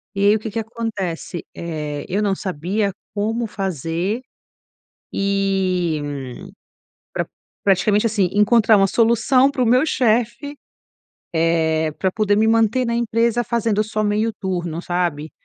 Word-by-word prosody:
e 200 0 +1
aí 205 +1 +6
o - - -1
que 220 +1 -5
que 225 - -2
acontece, 210 -7 -4
eh, 150 -3 -4
eu 195 +3 -1
não 195 -2 +1
sabia 190 +4 -2 0.2
como 225 +3 -1
fazer, 185 - -2 0.9
e, 190 -4 0 1.1
pra - - -2 0.4
praticamente 205 +2 +3
assim, 205 -5 +1
encontrar 215 +1 +5
uma 195 -1 +4
solução 235 +5 +3
para 260 -2 -1
o - - +2
meu 250 +5 +4
chefe, 245 +1 0 0.8
eh, 160 -1 +1
pra 190 -1 +1
poder 205 -1 +1
me 220 +1 +3
manter 230 +3 +3
na 235 - -1
empresa 235 0 +1
fazendo 225 -2 0
só 215 0 -2
meio 210 +2 +1
turno, 175 -4 -3
sabe, 175 -4 -2
205 Hz, 135 wpm, -21 LUFS, 180-225 Hz, 1.1 s, aí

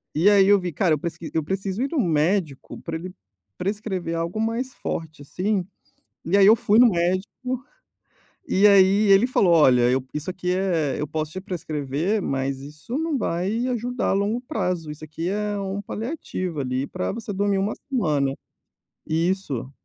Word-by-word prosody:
e 170 +7 +5
aí 200 -2 +5
eu 205 0 +6
vi: 180 -1 -3
"Cara, 170 +1 +2
eu - - -7
presqui 165 0 -6
eu 160 - 0
preciso 195 +5 -3
ir 275 - -1
no 315 - 0
médico 160 - 0
para 165 -1 -5
ele 180 +2 -8 0.4
prescrever 190 -3 -3
algo 170 +5 -2
mais 235 +4 -2
forte 155 -3 -5
assim". 190 +5 -1 0.6
E 185 +5 +2
aí 195 - +7
eu 220 +3 +8
fui 215 0 +3
no 245 -1 +8
médico, 195 +8 -2 0.8
e 195 -5 +3
aí 200 +1 +5
ele 195 +6 +6
falou: 195 -8 +3
"Olha, 130 -6 +5
eu 130 0 +1
isso 150 +3 -4
aqui 180 -1 -2
é 170 -7 0
eu 150 - -1
posso 155 +1 -3
te 185 - -5
prescrever, 160 +1 -2
mas 135 -3 -2
isso 150 - -6
não 320 -2 -1
vai 210 +5 -1
ajudar 245 0 -2
a - - +2
longo 205 +4 0
prazo. 180 - -2
Isso 150 +1 -10
aqui 165 +3 -5
é 205 0 -2
um 195 +1 -3
paliativo 205 - -4
ali 130 +1 -2
para 90 - -3
você 220 -1 -5
dormir 200 0 +1
uma 195 +2 -1
semana". 150 - +1 0.7
Isso. 160 -6 -1
185 Hz, 175 wpm, -24 LUFS, 155-210 Hz, 0.8 s, eu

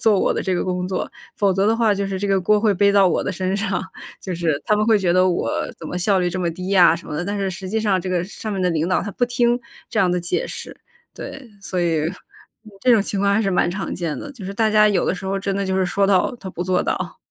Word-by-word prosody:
做 215 -3 +4
我 - - +2
的 - - -2
这 190 -2 0
个 - - -1
工 180 0 -2
作， 185 - -3 0.2
否 200 -4 +2
则 195 +2 +1
的 225 +1 +3
话 225 -3 +3
就 200 0 -2
是 195 -1 -3
这 205 - -2
个 195 -1 +2
锅 210 +4 +3
会 215 -1 +3
背 200 +1 +3
到 200 -1 +5
我 175 - +1
的 - - -2
身 185 +1 -2
上。 200 -2 -1 0.4
就 185 -2 -4
是 160 -4 0
他 210 - +3
们 210 +1 +1
会 220 -2 +5
觉 180 -3 +1
得 185 +1 +4
我 175 - 0 0.3
怎 160 - -8
么 180 - -4
效 195 +1 +2
率 180 -1 0
这 185 +1 -3
么 170 - 0
低 180 +3 -6
呀 175 -4 +5
什 - - -12
么 - - -6
的， 175 +4 -2
但 205 +1 -3
是 195 -1 -1
实 185 +1 -7
际 220 +3 0
上 200 -4 +1
这 185 - -5
个 180 -1 0
上 215 +2 -7
面 195 - -2
的 180 - +2
领 160 +1 0
导， 185 - +1
他 205 - -4
不 245 - 0
听 240 0 +1 0.3
这 - - +1
样 180 -2 +3
的 180 - +1
解 175 - -1
释， - - -8 0.4
对。 270 -3 -8
所 185 -2 -4
以 165 -1 +1 0.7
这 255 - +3
种 215 -3 +4
情 200 -1 -3
况 200 0 +2
还 220 - +2
是 195 - 0
蛮 180 -1 +2
常 190 -1 -4
见 165 -4 -3
的， 290 - -8
就 225 -7 -10
是 200 - -5
大 220 0 +2
家 215 0 +5
有 205 - +1
的 - - 0
时 190 +1 -7
候 195 +1 -1
真 195 0 -2
的 200 -1 -1
就 190 0 0
是 190 - +2
说 195 +2 +1
到 200 +6 +2
他 190 - -7
不 175 -1 -4
做 185 0 +1
到。 - - -3
190 Hz, 325 characters per minute, -21 LUFS, 180-205 Hz, 0.7 s, 到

